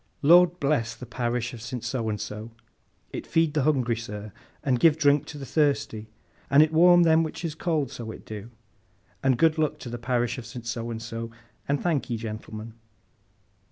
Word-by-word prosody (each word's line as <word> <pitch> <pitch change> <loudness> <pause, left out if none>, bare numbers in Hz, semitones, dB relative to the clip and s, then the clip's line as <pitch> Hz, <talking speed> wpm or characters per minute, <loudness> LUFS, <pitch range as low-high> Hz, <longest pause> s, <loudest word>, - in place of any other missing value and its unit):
Lord 175 +3 +6
bless 140 -6 0
the 125 - -9
Parish 120 0 -2
of 115 - -9
St. 120 +1 -5
So 115 -4 -2
and 105 -1 -2
So! 105 +2 -6 0.6
It - - -6
feed 165 -2 +2
the 150 - +1
hungry, 130 -5 +2
sir, 105 -2 -7 0.3
and 130 -3 +1
give 160 +1 +5
drink 145 -1 +3
to 150 - -8
the 140 - -7
thusty, 140 -8 0 0.4
and 140 +2 +7
it 155 0 -1
warm 175 +2 +7
them 160 -1 +5
which 165 +2 -4
is 160 - -2
cold, 155 -5 -1
so 115 -2 -7
it - - -9
do, 110 +1 -8 0.7
and 130 -2 +2
good 160 +1 +3
luck 155 -1 +1
to 125 - -8
the 120 - -5
parish 120 +1 -1
of 120 - -9
St. 115 +1 -8
So 115 0 -3
and 115 -1 -4
So, 115 0 -5 0.4
and 140 0 +1
thankee, 145 -8 -1
gentleman! 110 0 -7
130 Hz, 190 wpm, -26 LUFS, 115-155 Hz, 0.7 s, and